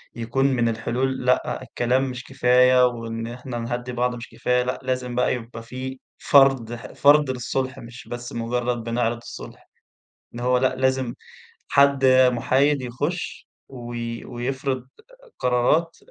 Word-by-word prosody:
يكون 120 +4 -1
من 120 -4 +2
الحلول، 125 +3 -2
لأ 125 +1 +1
الكلام 130 +2 0
مش 125 0 -6
كفاية 125 +1 +4
وإن 115 -1 -5
إحنا 120 0 -6
نهدّي 120 +1 -4
بعض 125 0 0
مش 115 0 -9
كفاية، 125 0 0
لأ 125 +1 -3
لازم 125 -1 -2
بقى 125 - +2
يبقى 115 -1 -7
في 130 +3 -7 0.2
فرض، 135 -4 +4
ح 115 -3 -8
فرض 145 0 +5
للصُلح 130 +1 -2
مش 120 +1 -11
بس 120 0 -7
مجرّد 120 0 -2
بنِعرِض 115 0 -1
الصُلح، 120 - -11 0.7
إن 120 - -6
هو 125 +1 +2
لأ 130 0 +1
لازم 130 -2 0 0.6
حد 140 -1 +4 0.3
مُحايد 135 +4 +2
يخُش، 145 +8 -4 0.2
وي 120 -2 -6
ويفرض 130 +1 -3 0.5
قرارات، 125 +7 +2
125 Hz, 140 wpm, -23 LUFS, 120-130 Hz, 0.7 s, فرض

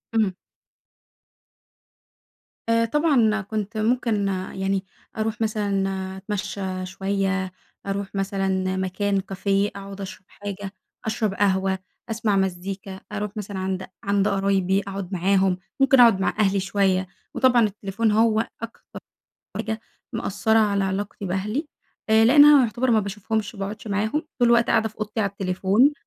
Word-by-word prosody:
إمم. 210 -4 +2 2.4
آآ، 230 0 +4
طبعًا 235 -6 +3
كنت 215 +2 -4
ممكن 220 -2 +1 0.3
يعني، 190 0 -1 0.3
أروح 220 0 -2
مثلًا، 195 -3 -1
أتمشى 195 -2 -4
شوية، 190 0 -1 0.3
أروح 200 0 -3
مثلًا، 190 -1 0
مكان 195 +2 0
كافيه 195 +1 0
أقعد 200 0 -8
أشرب 190 0 -8
حاجة، 200 -1 -7 0.3
أشرب 215 -2 0
قهوة، 190 -1 +1 0.3
أسمع 215 -2 0
مزيكا، 190 +1 -3
أروح 210 +1 -4
مثلًا 200 -2 -5
عند 190 0 -2 0.2
عند 200 0 +2
قرايبي 195 -1 +2
أقعد 195 -1 -6
معاهم، 190 0 +2 0.2
ممكن 270 -1 +5
أقعد 230 -5 +7
مع 190 - +1
أهلي 200 -1 +3
شوية، 190 -1 +1 0.3
وطبعًا 250 -2 +4
التليفون 210 +1 0
هو 220 +1 +3
أكتر 230 0 -9 0.6
حاجة 220 0 -3 0.3
مأثرة 220 0 +1
على 200 -2 +2
علاقتي 195 +1 -3
بأهلي، 210 - -2 0.4
آآ 220 0 +6
لأنها 290 +2 +8
يعتبر 240 +3 0
ما 220 - +4
باشوفهمش 210 +2 -3
وما 200 - -10
باقعدش 210 +3 -5
معاهم؛ 215 +9 0 0.2
طول 240 -2 +4
الوقت 235 0 +5
قاعدة 220 -1 +2
في 215 - -22
اوضتي 215 +1 -3
على 200 -2 +1
التليفون. 195 +7 +2
200 Hz, 130 wpm, -24 LUFS, 190-220 Hz, 2.4 s, لأنها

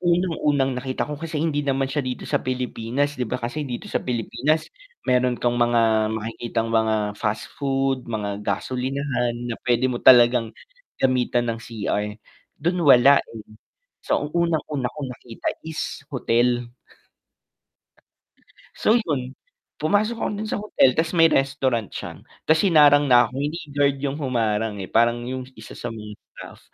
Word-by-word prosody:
Unang-unang 150 -7 +1
nakita 130 0 -2
ko 150 - -6
kasi 165 -1 -5
hindi 150 -1 0
naman 135 -1 0
siya 135 +3 -1
dito 130 -2 -5
sa - - 0
Pilipinas, 130 +2 -2
di 125 - -1
ba, 125 - -1
kasi 130 +4 -4
dito 120 - -5
sa - - -2
Pilipinas, 125 +6 -1 0.4
meron 125 -1 +2
kang 120 0 0
mga 115 -2 +3
makikitang 115 +1 -3
mga 110 -2 +1
fast 105 -1 -2
food, 135 -2 0
mga 105 -3 -3
gasolinahan 125 +1 -2
na 120 -2 -5
pwede 125 +1 +2
mo 120 - -4
talagang 120 -2 +5 0.4
gamitan 125 -2 +1
ng 115 - -7
cr 105 -2 -3 0.4
dun 175 +4 -1
wala 140 -2 +7
eh. 110 -2 -11 0.6
So, - - +1
ang - - -13
unang-una 155 -6 0
kung 145 -3 -6
nakita 120 -2 -8 0.2
is 160 -3 -5
hotel. 120 -2 +1 2.1
So 215 - +3
yun. 135 - -3 0.5
Pumasok 210 +8 +1
ako - - 0
dun 210 - -4
sa 215 - -3
hotel 205 -10 +3
ta's 160 +6 -1
may 165 - +6
restaurant 135 -5 +1
siya, - - -8 0.2
ta's 160 0 +3
hinarang 145 -5 +5
na 125 -1 +7
ako, - - -6
hindi 150 +3 -2 0.2
guard 140 -1 +2
yung 135 0 -2
humarang 110 -5 -1
eh, 100 - -5
parang 120 +4 +2
yung 130 +1 -5
isa 110 - -11
sa - - -6
mga 105 -2 -8 0.2
staff. - - -11
125 Hz, 155 wpm, -23 LUFS, 115-145 Hz, 2.1 s, wala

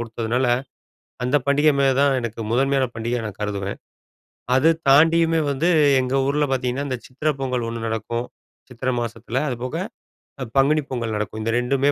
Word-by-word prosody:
கொடுத்ததுனால, 115 +2 -1 0.8
அந்த 125 +4 +2
பண்டிக 145 +2 +3
மேல 135 -1 +4
தான் 140 -1 +3
எனக்கு 115 -1 -5
முதன்மையான 135 +2 +2
பண்டிகையா 115 +1 -2
நான் 100 - -8
கருதுவேன். 100 -1 -3 0.7
அத 155 +5 +5 0.2
தாண்டியுமே 165 +3 +5
வந்து 140 +5 0 0.3
எங்க 130 +1 -2
ஊர்ல 145 +1 +1
பார்த்தீங்கன்னா, 130 +2 -1
இந்த 130 -2 -2
சித்திரை 145 +4 -1
பொங்கல் 125 -3 -1
ஒண்ணு 115 0 -5
நடக்கும். 115 +2 -3 0.4
சித்திரை 125 +1 -2
மாசத்துல 120 +3 -3
அதுபோக, 125 +1 -4 0.7
அ 130 - -2
பங்குனி 150 +3 +3
பொங்கல் 115 -4 -2
நடக்கும். 110 +1 -4
இந்த 115 - 0
2மே 135 +3 +1
125 Hz, 150 wpm, -22 LUFS, 115-140 Hz, 0.8 s, அத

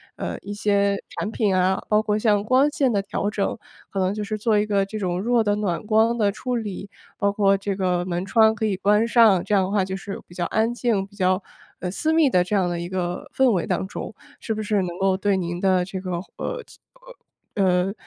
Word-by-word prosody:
呃， - - -4
一 205 - -6
些 200 -1 +1 0.2
产 215 - -2
品 205 -5 +1
啊， 185 +1 +2
包 210 0 +4
括 210 -1 0
像 210 -2 +2
光 260 +5 +3
线 275 -3 +1
的 200 - +1
调 205 +1 -2
整， 205 +1 -2 0.3
可 195 - -4
能 185 +1 +1
就 210 0 -4
是 215 +1 -3
做 215 0 +2
一 210 - +1
个 200 -2 +1
这 215 +2 -6
种 180 -2 -1
弱 235 +1 +2
的 205 -1 +1
暖 205 -1 -2
光 225 +2 +3
的 205 -2 +2
处 250 +4 -3
理， 205 -3 -5 0.3
包 200 0 +1
括 195 -1 +3
这 200 0 -3
个 180 -2 0
门 175 0 -2
窗 220 +2 +4
可 220 - -2
以 205 -3 0
关 210 +3 +3
上， 225 -6 +5
这 - - -2
样 195 -2 +4
的 - - -4
话 200 -2 +2
就 190 0 -4
是 195 +1 -7
比 - - -15
较 175 0 -2
安 220 +5 0
静， 230 -5 0
比 200 - -20
较， 185 0 +1 0.4
呃， 180 - -3
私 315 +11 0
密 320 -4 +4
的 180 - +3
这 205 +4 -2
样 185 -3 +2
的 175 -1 -3
一 170 - -4
个 180 -1 -4
氛 265 -2 +4
围 180 -6 0
当 - - -1
中， - - -7 0.2
是 225 - -3
不 215 0 -4
是 205 -2 +1
能 175 -1 -4
够 190 -1 +2
对 200 0 +1
您 175 -1 -3
的 185 -1 +2
这 190 +1 -5
个， 185 -1 -5 0.3
呃， - - -4 0.9
呃， 200 - +2
呃， 180 +1 +2
200 Hz, 260 characters per minute, -23 LUFS, 185-215 Hz, 0.9 s, 上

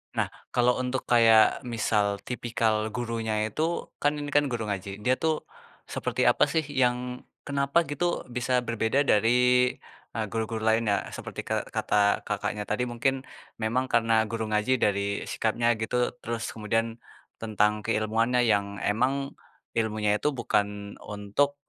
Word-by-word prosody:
Nah, - - +1 0.3
kalau 125 +1 +3
untuk 130 +1 -2
kayak 115 0 +5
misal 105 -3 0
tipikal 115 -3 0
gurunya 115 -2 -2 0.2
itu, 160 +7 -2
kan 145 +1 +2
ini 145 0 -5
kan 145 0 +3
guru 120 -3 -3
ngaji, 100 -1 -3
dia 125 - +3
tuh 160 -1 0 0.4
seperti - - -2
apa - - +3
sih 160 -1 0 0.2
yang, 125 0 0 0.2
kenapa 140 +3 +2
gitu 170 +5 -2
bisa 125 +1 0
berbeda 115 +5 +1
dari, 110 +3 +4 0.8
eee, 110 - -1
guru-guru 110 0 -2
lainnya? 110 -2 +2
Seperti - - -6
ke - - 0 0.2
kata 100 -1 +2
Kakaknya 105 - -2
tadi, 110 +4 0
mungkin 130 +2 0 0.4
memang 125 +4 +1
karena 115 -1 +3
guru 115 0 -3
ngaji 105 +4 +1
dari 100 0 0
sikapnya 115 +1 0
gitu, 110 +2 -2 0.3
terus 115 0 -3
kemudian 115 +1 -1 0.4
tentang 105 -1 +1
keilmuannya 115 +2 +1
yang 100 -1 +2 0.2
emang 135 +6 0 0.5
ilmunya 110 -1 0
itu - - -1
bukan 105 -3 +2 0.4
untuk, 105 +8 -1
115 Hz, 140 wpm, -27 LUFS, 110-125 Hz, 0.8 s, kayak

